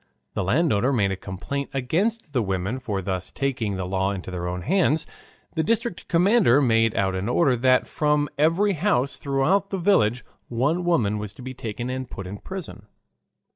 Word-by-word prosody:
The - - -1
landowner 125 - +2
made 100 -7 +2
a - - -1
complaint 95 +10 -5
against 170 - -1
the 125 - +2
women 95 +4 -2
for 100 -6 -3
thus 95 -1 -3
taking 120 -7 -2
the 95 -1 -3
law 95 +1 0
into 95 -2 -5
their 90 -1 -3
own 90 0 -4
hands. 165 -2 +2 0.5
The 160 - 0
district 225 0 -1
commander 180 - +4
made 115 -4 +3
out 95 -1 +1
an 95 +4 -2
order 135 0 +3
that 130 +1 +3
from 150 -1 +1
every 165 +8 +3
house 160 -6 +1
throughout 155 +9 +1
the 195 - -2
village 125 - +2 0.2
one 145 +9 0
woman 110 -12 +2
was 105 -1 -6
to 125 - -12
be 130 +1 -6
taken 120 +1 -5
and 130 -1 -4
put 95 - -7
in 100 +2 -7
prison. 125 - -8
130 Hz, 180 wpm, -24 LUFS, 100-160 Hz, 0.5 s, commander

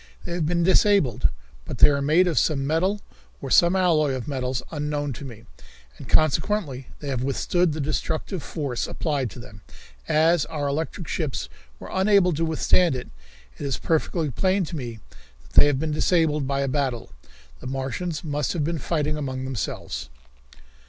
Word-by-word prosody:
They - - -5
have 170 -3 -1
been 170 +1 +1
disabled, 190 - +3 0.3
but - - -6
they - - +8
are 140 -1 +1
made 155 +6 +4
of 165 - +2
some 140 -4 +1
metal 185 +8 +1 0.4
or 135 - -6
some 175 +2 +5
alloy 160 -6 +3
of 130 0 -4
metals 130 -3 -2
unknown 145 -2 -2
to 130 +5 -8
me, 115 -4 -10 0.6
and - - -10
consequently 155 -3 +1
they 145 - -6
have 130 -3 -1
withstood 165 +6 +1
the 155 - -4
destructive 155 +4 -2
force 140 -7 -3
applied 145 -6 -1
to - - -12
them, 110 -4 -12 0.5
as 160 0 +4
our 145 0 -3
electric 160 +4 -3
ships 150 -4 -2 0.3
were - - -10
unable 190 -2 +4
to 160 +2 -1
withstand 160 0 +2
it. 125 - -6 0.5
It - - -5
is 135 -3 -1
perfectly 160 -1 0
plain 185 +7 +1
to 165 - -6
me 120 -6 -5 0.5
that - - -21
they - - +7
have 145 -2 +1
been 155 +1 -1
disabled 155 -2 +2
in 135 - -3
a 140 0 0
battle. 130 - -2 0.5
The - - -8
Martians 135 +5 -3
must 145 -2 -1
have 165 -4 -1
been 165 +1 -1
fighting 150 +1 -1
among 130 -3 -3
themselves." 90 - -4
150 Hz, 175 wpm, -24 LUFS, 135-170 Hz, 0.6 s, they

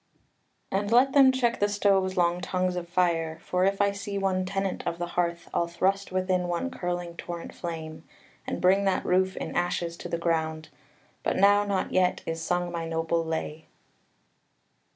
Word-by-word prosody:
"And 205 +1 0
let 260 +3 +5
them 270 -2 +7
check 245 -2 0
the 205 - +2
stove's 195 -2 +2
long 175 0 +2
tongues 185 0 -1
of 175 -1 -5
fire: 170 -3 +1
For 180 +1 +1
if 195 0 +1
I 200 0 +3
see 200 0 -5
one 190 -1 0
tenant 195 0 -2
of 170 - -1
the 175 0 -4
hearth, 170 -1 -1
I'll 170 - +1
thrust 190 +4 0
within 185 -1 0
one 175 +10 -2
curling 175 -3 -4
torrent 170 -1 -6
flame, 160 -2 -6 0.4
And - - -3
bring 195 +2 +4
that 195 - +1
roof 185 +1 +2
in - - -5
ashes 175 -1 -1
to - - -7
the 170 - -1
ground: 160 -2 -1 0.5
But - - -1
now 205 +1 +5
not 200 -2 -1
yet 185 -1 +2
is 165 0 -3
sung 175 +1 -1
my 165 -1 -3
noble 165 +1 0
lay." 160 -1 -4
180 Hz, 175 wpm, -27 LUFS, 170-195 Hz, 0.5 s, them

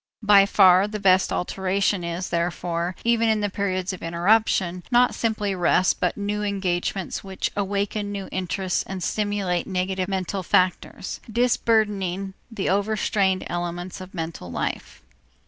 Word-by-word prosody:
By 200 -1 +6
far 190 -1 +6
the 210 0 -5
best 190 -1 +4
alteration 190 +1 0
is, 170 +2 -4
therefore, 170 +1 -2
even 230 -1 +3
in 215 -1 +2
the 205 -1 -1
periods 185 -1 -2
of 185 - -9
interruption, 180 +1 +1
not 245 0 +4
simply 215 -3 -1
rest 185 0 +2
but 180 - 0
new 205 +1 -2
engagements 190 -2 -2
which 190 -1 -3
awaken 205 +1 -2
new 200 -1 -5
interests 185 0 -1
and 190 -2 -5
stimulate 205 -4 -1
neglected 185 0 -1
mental 190 0 -2
factors, 185 +1 0
disburdening 210 -5 +1 0.2
the 225 -4 -3
over 205 +3 +1
strained 190 -3 +1
elements 175 +1 -4
of 185 +1 -10
mental 160 - -5
life. - - -4
190 Hz, 140 wpm, -24 LUFS, 180-205 Hz, 0.2 s, By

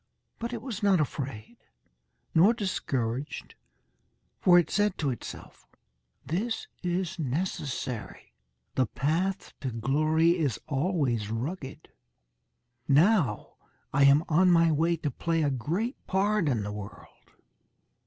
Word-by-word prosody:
But 235 +1 -3
it 235 -2 -5
was 230 -6 -5
not 200 -3 +4
afraid, 130 -6 -4 0.8
nor 195 +9 +5
discouraged, 135 - -3 0.9
for 175 -1 +6
it 175 - +3
said 205 -1 +1
to 145 -4 0
itself: 120 - -9 0.6
"This 205 - -2
is 180 0 -2
necessary. 135 - -4 0.4
The 130 -3 +1
path 170 - -1
to 135 - -3
glory 155 +8 +2
is 145 -7 0
always 135 - 0
rugged. 135 +6 -5 1.0
Now 150 - +3 0.4
I 140 0 +5
am 140 +3 +6
on 180 +3 +4
my 165 -1 +5
way 165 +3 +2
to 150 -2 -3
play 165 +5 0
a 145 - +1
great 170 - -2
part 195 -2 +1
in 115 -6 0
the 105 - -4
world." 105 -1 -11
155 Hz, 120 wpm, -28 LUFS, 135-185 Hz, 1.0 s, for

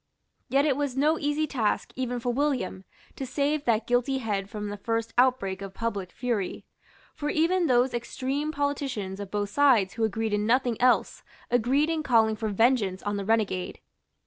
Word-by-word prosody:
Yet 275 +2 +3
it 285 -4 +2
was 280 -2 -2
no 305 +3 +3
easy 295 +1 0
task 240 -8 -1
even 245 -1 -2
for 245 +1 -1
William 255 -9 -1 0.3
to - - -5
save 285 +3 -1
that 225 -1 +2
guilty 245 +2 +1
head 205 -5 -2
from 210 -1 -5
the 205 - -5
first 225 +2 -2
outbreak 240 -7 +2
of 195 -1 -8
public 205 -6 -3
fury. 235 -6 -3 0.5
For 295 - -3
even 335 +3 +2
those 250 0 +3
extreme 265 +5 -2
politicians 270 -10 -2
of 200 -1 -6
both 205 0 -2
sides 230 -7 +4
who 225 - -2
agreed 220 0 -1
in 210 +1 0
nothing 245 -1 +1
else 250 0 +2 0.3
agreed 260 +6 +2
in 320 -1 -1
calling 225 -6 +3
for 220 0 -3
vengeance 210 -3 +2
on 205 0 -2
the 200 - -4
renegade. 210 -4 0
240 Hz, 175 wpm, -27 LUFS, 210-275 Hz, 0.5 s, sides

